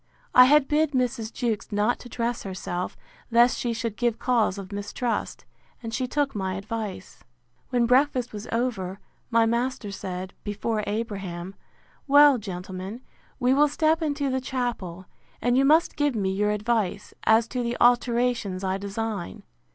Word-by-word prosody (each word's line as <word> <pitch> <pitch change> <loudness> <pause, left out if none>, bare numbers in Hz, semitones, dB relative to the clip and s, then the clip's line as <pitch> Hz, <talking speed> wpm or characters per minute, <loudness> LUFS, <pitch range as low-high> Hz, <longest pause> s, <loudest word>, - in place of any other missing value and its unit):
I 250 - +9
had 290 +1 +5
bid 300 0 +2
Mrs. 245 -3 -1
Jewkes 230 -4 -2
not 210 +4 +1
to 245 - -11
dress 235 0 -2
herself, 185 -2 -4 0.3
lest 240 +1 +5
she 240 - -1
should 230 -2 -3
give 240 -1 0
cause 230 -6 +1
of 195 0 -8
mistrust; 205 +4 -3 0.4
and 225 0 -5
she 255 +1 -1
took 285 +1 0
my 190 -2 -2
advice. 205 -1 -6 0.5
When 245 -2 +2
breakfast 255 -1 +2
was 210 +1 -7
over, 215 -6 -2 0.3
my 230 -1 +4
master 235 -2 -1
said, 185 -1 -6
before 210 +1 -2
Abraham, 195 -5 -4 0.5
Well, 285 -2 +7
gentlemen, 190 +2 -6 0.4
we 250 0 +3
will 295 +2 +5
step 315 +3 +1
into 285 -3 -1
the 260 0 -1
chapel; 240 -9 -3 0.3
and 245 +1 +1
you 270 +1 +4
must 315 +4 +4
give 290 -3 +1
me 195 -3 0
your 205 +2 +1
advice, 210 -2 -1
as 220 +1 +4
to 250 - -2
the 235 0 -2
alterations 240 -5 +2
I 190 0 -1
design. 200 -1 -4
230 Hz, 155 wpm, -25 LUFS, 200-250 Hz, 0.5 s, I